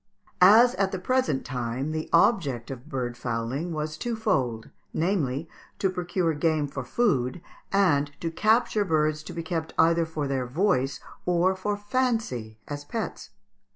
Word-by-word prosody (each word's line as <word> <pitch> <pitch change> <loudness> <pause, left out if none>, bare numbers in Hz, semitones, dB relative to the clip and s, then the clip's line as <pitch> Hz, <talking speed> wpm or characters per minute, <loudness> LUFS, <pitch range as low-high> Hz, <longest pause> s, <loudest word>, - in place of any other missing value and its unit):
] - - -38 0.2
As 240 +1 +6
at 190 -1 +2
the 190 - -2
present 220 - 0
time, 125 +3 -3
the 155 0 -3
object 165 - +2
of 130 +3 -9
bird 125 -4 -3
fowling 120 +7 -3
was 155 0 -4
twofold, 135 - -1 0.2
namely, 160 -4 0 0.3
to 190 - +1
procure 180 -2 -1
game 155 -1 +1
for 135 -1 -5
food 130 - +1 0.3
and 160 -8 +3
to 165 - -3
capture 215 +3 +2
birds 155 -4 +1
to - - -9
be 165 - -4
kept 165 -1 -3
either 165 0 +4
for 155 -3 -3
their 130 -2 -1
voice 135 -2 +1 0.3
or 180 +2 +3
for 205 +2 -2
fancy 205 - -1
as 145 0 -5
pets. 220 +8 -5
160 Hz, 155 wpm, -26 LUFS, 135-190 Hz, 0.3 s, As